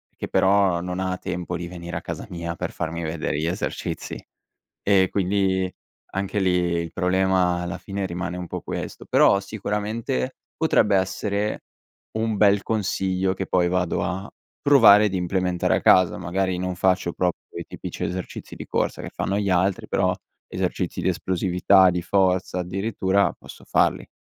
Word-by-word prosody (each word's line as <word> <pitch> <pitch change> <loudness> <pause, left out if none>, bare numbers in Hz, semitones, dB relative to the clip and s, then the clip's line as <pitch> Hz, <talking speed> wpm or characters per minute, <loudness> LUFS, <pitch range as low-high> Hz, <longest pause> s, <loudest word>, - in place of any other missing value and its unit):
che - - -5
però 95 -2 +3
non 90 +1 -4
ha 95 -1 -1
tempo 90 -1 -4
di 85 - -5
venire 85 -1 -6
a - - -5
casa 85 -2 -6
mia 85 -2 -4
per - - -4
farmi 80 +1 -4
vedere 80 -2 -2
gli 80 - -1
esercizi. 90 +4 -4 0.6
E 95 -2 +4
quindi 95 -1 +1 0.4
anche 95 +1 -2
lì 95 -1 +2 0.3
il 85 -1 -5
problema 90 -1 +2
alla 85 0 -4
fine 100 -1 -4
rimane 90 0 -4
un 90 - -5
po' - - -6
questo. - - -6
Però 100 - +4
sicuramente 105 - -3 0.2
potrebbe 100 -2 +3
essere 100 +2 -1 0.5
un 110 -1 0
bel 100 -1 +4
consiglio, 95 -3 0
che 95 0 -4
poi 90 -1 +2
vado 90 -1 0
a 95 +3 -3 0.3
provare 105 -7 +7
d'implementare 90 -1 0
a - - 0
casa. 95 -2 +5
Magari 95 +1 -1
non 90 0 -3
faccio 90 -1 +1
proprio 90 -1 -1 0.2
i - - -5
tipici - - -6
esercizi 90 +1 -5
di - - -8
corsa - - -1
che - - -6
fanno 100 - -1
gli 100 -2 0
altri, 95 +1 +1
però 90 -1 +1 0.3
esercizi - - -2
di - - +1
esplosività, 95 +1 +3
di 90 0 -1
forza 90 0 +1
addirittura, 95 +1 0
posso - - -13
farli. - - +1
95 Hz, 160 wpm, -24 LUFS, 90-100 Hz, 0.6 s, provare